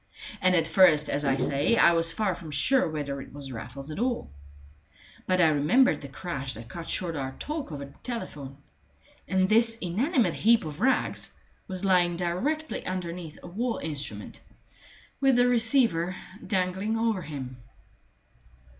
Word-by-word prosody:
And 185 0 +4
at 165 -2 +3
first, 160 -3 +5
as 145 - 0
I 135 -1 +3
say, 140 +11 +2
I 170 - +6
was 165 0 +2
far 210 -4 0
from 170 -2 -9
sure 165 - +2
whether 145 -3 -4
it - - -11
was 140 -1 -9
Raffles 130 +5 -7
at 155 - -6
all; 240 - -1 1.0
but 185 0 +2
I 165 -3 +6
remembered 155 - +3
the 140 - -7
crash 135 -4 -5
that 115 +1 -10
cut 170 +4 -7
short 170 -3 -2
our 135 -2 -4
talk 300 - -5
over 140 -2 -6
the 140 - -15
telephone; 145 - -6 0.7
and 185 0 +2
this 225 +2 +3
inanimate 230 - +1
heap 230 -3 +3
of 150 -1 -7
rags 265 +1 0 0.3
was 190 0 -4
lying 175 -2 +3
directly 255 - -2
underneath 175 -3 -5
a - - -8
wall 230 +7 -2
instrument, 150 -3 -4 0.8
with 270 -2 +4
the 245 0 +4
receiver 225 -8 +3 0.3
dangling 190 +2 0
over 225 -4 0
him. 135 -5 -7
175 Hz, 155 wpm, -27 LUFS, 145-225 Hz, 1.0 s, I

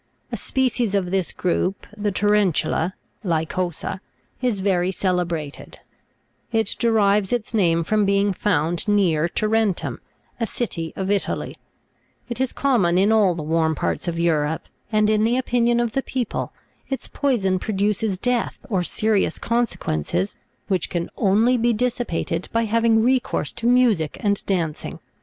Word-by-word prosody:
A - - -1
species 250 -5 0
of 180 -3 0
this 190 -3 0
group, 185 +2 -1
the 210 -1 -1
tareri'tula 195 -4 +1 0.3
(Lycosa) 175 +1 -2 0.4
is 240 -6 0
very 185 -2 +1
celebrated; 175 -6 -2 0.7
it 225 -2 +1
derives 210 -4 +3
its 240 -2 -2
name 170 -6 +3
from 215 +5 +1
being 200 0 +2
found 175 -2 0
near 175 -6 +3
Tarentum, 215 -1 0 0.4
a 230 - 0
city 170 -8 -3
of 190 +1 -2
Italy: 205 - -1 0.7
it 240 +1 -3
is 260 - 0
common 215 -11 +2
in 200 +3 +4
all 205 -5 +4
the 160 - -4
warm 160 0 +1
parts - - -2
of 170 -1 -2
Europe, 160 -2 0 0.2
and 215 -1 +3
in 215 0 +3
the 235 +3 +2
opinion 240 -2 +2
of 240 -1 0
the 270 - 0
people, 255 -4 -3 0.4
its 270 - -4
poison 200 -10 0
produces 205 0 0
death 245 +3 -1
or 190 -3 +2
serious 215 +3 +1
consequences, 205 - -1 0.3
which 185 -5 0
can 170 -1 -3
only 225 +5 +3
be 235 +1 +3
dissipated 225 -8 -2
by 230 0 +1
having 225 0 +3
recourse 255 +1 +1
to 235 0 -3
music 235 -11 +3
and 200 -1 0
dancing. 170 -6 -2
205 Hz, 145 wpm, -22 LUFS, 175-230 Hz, 0.7 s, in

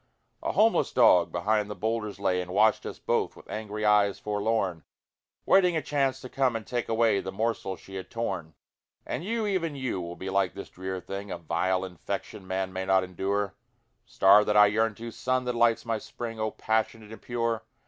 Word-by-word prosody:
A - - -2
homeless 225 +1 +3
dog 90 -8 +5
behind 105 +4 0
the 105 - -5
boulders 105 0 -2
lay 90 -2 +1
And 90 - -7
watched 105 +3 +3
us - - -6
both - - -1
with - - -15
angry 105 0 -4
eyes 105 -1 +4
forlorn, 105 -5 -1 0.6
Waiting 180 -3 +4
a - - 0
chance 135 -2 0
to - - -7
come 130 -2 +1
and 110 -1 -4
take 120 -1 -3
away 115 -2 +3
The 95 - -5
morsel 110 -2 -2
she 95 - -15
had 95 -1 -7
torn. 90 -9 -4 0.5
And - - -4
you, 225 +3 -1
even 175 -7 -1
you, 130 -8 -2
will 85 0 -6
be 95 +1 -5
like 95 -2 +1
this - - -8
drear 95 0 -5
thing, 100 +2 -6
A 90 - -4
vile 90 +3 0
infection 95 +1 -6
man 95 0 -2
may 95 0 -2
not 95 0 +3
endure; 95 +2 -2 0.5
Star 105 -2 +5
that 105 0 +1
I 105 - +9
yearn 110 +1 +1
to! 115 +2 -7
Sun 130 +2 -1
that 125 - -1
lights 115 -1 +2
my 115 -1 -1
spring! 115 +1 -7
O 110 0 0
passionate 110 0 -2
and 110 - -10
pure! 115 -2 -1
105 Hz, 200 wpm, -28 LUFS, 95-115 Hz, 0.6 s, I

